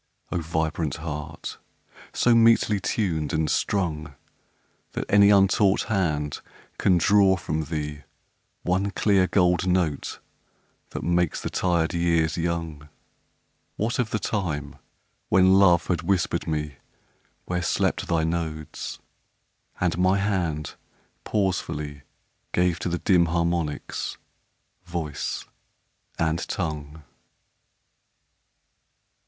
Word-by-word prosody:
O 90 - 0
vibrant 80 -1 -1
heart! 75 -1 -6 0.5
so 120 - +3
metely 115 -2 +4
tuned 80 -10 -1
and 80 0 +1
strung 80 -6 -1 0.8
That - - -3
any 100 0 +6
untaught 100 0 +4
hand 75 -7 -1 0.4
can 90 -2 +4
draw 95 +2 +5
from 80 -2 -3
thee 75 -1 -4 0.6
One 95 +3 +1
clear 100 -2 +2
gold 90 -2 +2
note 90 -5 0 0.7
that - - -6
makes 85 0 +1
the - - -4
tired 85 -2 +1
years 85 -2 +1
young 85 -3 -3 0.9
What 115 +4 -1
of 120 -3 +1
the 110 - 0
time 75 -10 -3 0.5
when 95 0 +5
Love 90 -3 +5
had 85 -3 0
whispered 90 0 0
me 75 -3 -3 0.7
Where 90 0 -2
slept 85 - 0
thy 85 -2 +1
nodes, 80 -2 -3 0.8
and 90 -1 0
my 95 +2 +3
hand 90 -7 -1 0.5
pausefully 75 -8 -2 0.5
Gave 90 -1 +2
to 90 - -2
the 85 - -1
dim 90 -2 +3
harmonics 85 -2 -2 0.7
voice 85 -5 -4 0.7
and 80 0 +1
tongue? 75 -3 -4
85 Hz, 105 wpm, -25 LUFS, 80-95 Hz, 0.9 s, any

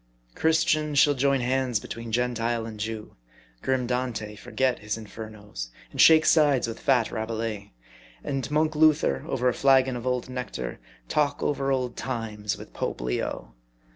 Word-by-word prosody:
Christian 155 - +2
shall 145 +1 +6
join 140 0 +2
hands 125 -2 +1
between 115 +2 -7
Gentile 120 -1 0
and 110 -2 -8
Jew; 110 0 -5 0.5
grim 130 -1 0
Dante 125 -4 -2
forget 130 +4 -1
his 105 +1 -3
Infernos, 105 - -8 0.2
and - - +1
shake 160 -1 +7
sides 145 -6 +4
with 115 - -6
fat 125 -4 +2
Rabelais; 110 -2 -4 0.5
and 135 -2 -3
monk 155 +1 +1
Luther, 150 - +3
over 125 -2 0
a 125 - +3
flagon 135 -1 +4
of 120 +1 -5
old 125 -1 0
nectar, 125 - -5 0.3
talk 145 - 0
over 135 -1 0
old 125 -2 -1
times 110 -5 -3
with - - -12
Pope - - -3
Leo. - - -3
125 Hz, 150 wpm, -26 LUFS, 110-135 Hz, 0.5 s, shake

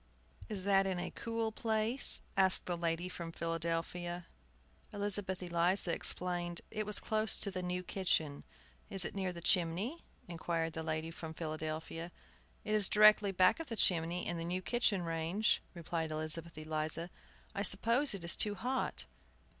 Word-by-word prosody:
"Is 200 -4 -4
that 195 0 +3
in 190 -1 -1
a 175 +1 -4
cool 230 -1 -3
place?" 220 +3 +2
asked 190 -1 +4
the 175 - -1
lady 170 +1 -1
from 170 -2 -7
Philadelphia. 170 +1 -3 0.7
Elizabeth 200 -2 -2
Eliza 175 +1 +1
explained 175 -1 -1
it 215 -1 -3
was 210 - +3
close 220 0 +1
by 200 - +1
the 185 -1 -4
new 180 0 -3
kitchen. 160 -6 -1 0.5
"Is 195 -2 +6
it - - -4
near 190 -2 -2
the 170 -1 -8
chimney?" 185 - +2 0.2
inquired 165 -1 -2
the 160 - -4
lady 160 0 -3
from 160 -1 -8
Philadelphia. 160 +1 -5 0.5
"It 215 - -2
is 210 -2 +4
directly 215 -1 +6
back 185 - +4
of 330 - -6
the 230 - -4
chimney 175 -3 +2
and 170 -1 -2
the - - -3
new 180 +2 -3
kitchen 220 -6 +1
range," 165 +5 0
replied 165 -1 -3
Elizabeth 155 +1 -1
Eliza. 155 +2 -2 0.4
"I 200 - -2
suppose 230 +7 +3
it 185 - -7
is 170 - +3
too 210 -1 +1
hot!" 255 +5 -2
180 Hz, 160 wpm, -34 LUFS, 165-205 Hz, 0.7 s, Is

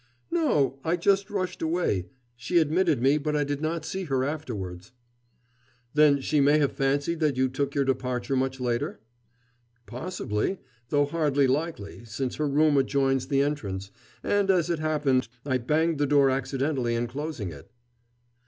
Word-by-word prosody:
"No. 150 - +1
I 165 +2 +1
just 195 +3 +2
rushed 185 -3 -3
away. 160 - 0 0.3
She 120 +9 -1
admitted 160 -4 +2
me, 140 +3 +4
but 150 +1 -2
I 150 - +2
did 145 0 -3
not 160 +1 -2
see 190 0 -4
her 135 -4 0
afterwards." 110 - -5 1.0
"Then 150 -2 +5
she 150 +2 +1
may 145 +2 +5
have 145 -2 +2
fancied 140 +4 0
that 150 -5 +1
you 130 0 +3
took 140 +2 -3
your 140 -1 +2
departure 130 0 -1
much 130 0 -1
later?" 120 -3 -2 0.9
"Possibly, 125 - -3 0.3
though 145 -1 +3
hardly 145 -2 +1
likely, 135 -6 -2
since 120 +3 -4
her 150 - 0
room 150 +1 +3
adjoins 135 -1 +1
the 140 -1 +2
entrance, 100 -10 -3 0.3
and, 205 -1 +1
as 175 -3 +3
it 165 - -1
happened, 145 -5 +1 0.2
I 130 -3 +1
banged 155 +5 +1
the 145 - +2
door 140 -1 +4
accidentally 135 -2 -1
in 120 +1 0
closing 135 - -5
it." - - -12
140 Hz, 160 wpm, -26 LUFS, 130-155 Hz, 1.0 s, Then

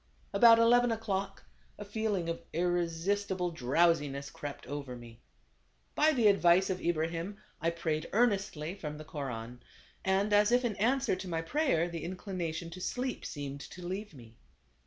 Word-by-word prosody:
About 230 -1 +8
eleven 240 +1 +5
o'clock 195 -3 -3 0.3
a 205 - -7
feeling 205 -4 -1
of 170 0 -3
irresistible 175 +2 0
drowsiness 145 -1 +1
crept 145 -1 -7
over 140 -2 -5
me. 120 -1 -12 0.7
By 310 +1 +4
the 245 -7 +1
advice 190 -2 +5
of 185 - -3
Ibrahim 170 +3 -1 0.2
I 165 - +2
prayed 160 -2 -2
earnestly 195 -8 +1
from 150 -6 -6
the 155 - -9
Koran. 125 -5 -6 0.4
And 195 +2 +1
as 205 +2 +5
if 245 +1 +3
in 220 -4 -1
answer 250 +2 +2
to 185 +1 -7
my 165 -2 -2
prayer 220 - +1
the 170 -2 -6
inclination 175 -2 -4
to 180 +2 -8
sleep 250 +6 -3
seemed 140 -1 -6
to 180 +4 -9
leave 190 0 -5
me. 115 -3 -14
175 Hz, 155 wpm, -31 LUFS, 155-205 Hz, 0.7 s, About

